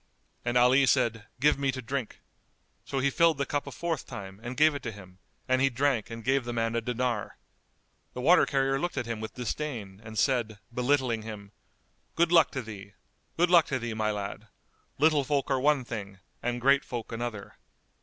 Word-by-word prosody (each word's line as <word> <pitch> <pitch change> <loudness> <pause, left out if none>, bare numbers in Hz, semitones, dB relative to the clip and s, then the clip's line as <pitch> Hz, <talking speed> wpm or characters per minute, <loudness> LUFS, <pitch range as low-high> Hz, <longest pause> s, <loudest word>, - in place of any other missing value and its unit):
And 120 0 +1
Ali 130 +3 +5
said, 115 -5 +1
"Give 145 +1 +3
me 135 -1 +1
to 130 - -5
drink." 130 -1 -4 0.6
So 135 - -4
he 135 +1 +2
filled 165 -1 +4
the 140 - 0
cup 145 +1 -2
a - - -5
fourth 165 +3 -3
time 95 -1 -8
and 120 +2 -6
gave 155 +1 +5
it 145 - -5
to 115 - -4
him; 95 -3 -14 0.3
and 130 0 +2
he 135 - +4
drank 130 -3 0
and 115 0 -7
gave 135 +1 +2
the 120 - -4
man 115 0 -1
a 115 - +1
dinar. 120 -2 -2 0.8
The 125 - -4
water 170 +6 +5
carrier 135 -1 +1
looked 175 0 -3
at 125 - -1
him 115 -1 -4
with 110 0 -6
disdain 115 -6 -4
and 110 0 -9
said, 115 -2 +1 0.2
belittling 125 -2 +1
him, 105 -2 -8 0.6
"Good 170 0 +2
luck 165 -2 +6
to 130 - -3
thee! 100 -2 -10 0.4
Good 175 +1 +3
luck 170 -3 +6
to 135 - -1
thee, 120 -2 -4
my 110 -1 0
lad! 105 +1 -4 0.5
Little 150 0 +4
folk 140 0 -1
are 135 - +2
one 140 -1 +2
thing 100 -4 -6 0.2
and 120 0 -2
great 140 +3 +4
folk 120 -4 -6
another!" 115 -3 -5
125 Hz, 200 wpm, -28 LUFS, 110-140 Hz, 0.8 s, luck